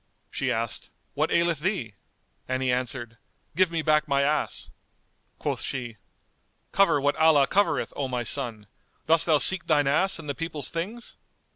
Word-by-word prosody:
She -, -, -1 dB
asked, -, -, -3 dB, 0.2 s
"What -, -, 0 dB
aileth 170 Hz, -3 st, +2 dB
thee?"; 155 Hz, -, -2 dB, 0.5 s
and 130 Hz, +1 st, -1 dB
he 130 Hz, -, +1 dB
answered, 125 Hz, -2 st, -3 dB, 0.4 s
"Give 185 Hz, +1 st, +3 dB
me 165 Hz, -1 st, -2 dB
back 155 Hz, -1 st, +2 dB
my 140 Hz, -1 st, +2 dB
ass." 150 Hz, +2 st, -1 dB, 0.7 s
Quoth -, -, -3 dB
she, 120 Hz, -4 st, -5 dB, 0.7 s
"Cover 195 Hz, -7 st, +3 dB
what 145 Hz, +1 st, +1 dB
Allah 160 Hz, -3 st, +5 dB
covereth, 200 Hz, +8 st, 0 dB
O 140 Hz, -, -2 dB
my 125 Hz, -1 st, -2 dB
son! 115 Hz, -4 st, 0 dB, 0.4 s
Dost 165 Hz, +1 st, +3 dB
thou 155 Hz, -2 st, +5 dB
seek 190 Hz, +4 st, +3 dB
thine 150 Hz, -3 st, +3 dB
ass 170 Hz, +8 st, +2 dB
and 160 Hz, -2 st, -9 dB
the 140 Hz, -, -2 dB
people's 155 Hz, -3 st, -3 dB
things?" 210 Hz, +9 st, -5 dB
150 Hz, 160 wpm, -26 LUFS, 130-165 Hz, 0.7 s, Allah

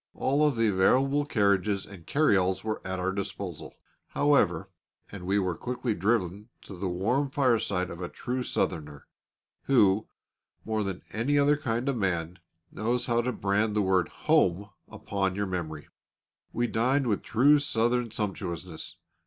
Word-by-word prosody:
All 140 Hz, +3 st, +1 dB
of 150 Hz, -3 st, +3 dB
the 115 Hz, -1 st, +2 dB
available 135 Hz, +9 st, +2 dB
carriages 100 Hz, -3 st, +1 dB
and 95 Hz, -5 st, -13 dB
carry 150 Hz, -7 st, +3 dB
alls 95 Hz, 0 st, +1 dB
were 110 Hz, 0 st, -3 dB
at 95 Hz, 0 st, -3 dB
our 90 Hz, +1 st, -1 dB
disposal, 95 Hz, -3 st, -6 dB, 0.3 s
however, 100 Hz, -10 st, +2 dB, 0.4 s
and 90 Hz, -3 st, -8 dB
we 100 Hz, +2 st, +2 dB
were 95 Hz, -3 st, 0 dB
quickly 125 Hz, +3 st, -2 dB
driven 105 Hz, 0 st, -1 dB
to 100 Hz, -, -10 dB
the 90 Hz, +1 st, -3 dB
warm 120 Hz, +11 st, 0 dB
fireside 115 Hz, -9 st, +1 dB
of 85 Hz, -, -8 dB
a 90 Hz, -, -4 dB
true 125 Hz, +1 st, -4 dB
Southerner, 75 Hz, -, -3 dB, 0.6 s
who, 110 Hz, -6 st, +3 dB, 0.6 s
more 110 Hz, -1 st, -1 dB
than 95 Hz, -2 st, -5 dB
any 125 Hz, +7 st, 0 dB
other 145 Hz, +1 st, +4 dB
kind 125 Hz, -4 st, -2 dB
of 135 Hz, -3 st, 0 dB
man, 90 Hz, -4 st, -1 dB, 0.3 s
knows 120 Hz, +4 st, -1 dB
how 120 Hz, -1 st, +2 dB
to 125 Hz, +1 st, -1 dB
brand 105 Hz, 0 st, 0 dB
the 105 Hz, -, +2 dB
word 95 Hz, -3 st, +2 dB, 0.2 s
"Home" 95 Hz, +3 st, +2 dB, 0.2 s
upon 95 Hz, -2 st, -2 dB
your 100 Hz, 0 st, -1 dB
memory. 80 Hz, -5 st, -5 dB, 0.6 s
We 120 Hz, -, 0 dB
dined 125 Hz, +5 st, +1 dB
with 105 Hz, -4 st, 0 dB
true 140 Hz, +6 st, +4 dB
Southern 120 Hz, -3 st, 0 dB
sumptuousness. 95 Hz, -6 st, -4 dB
105 Hz, 155 wpm, -28 LUFS, 95-125 Hz, 0.6 s, other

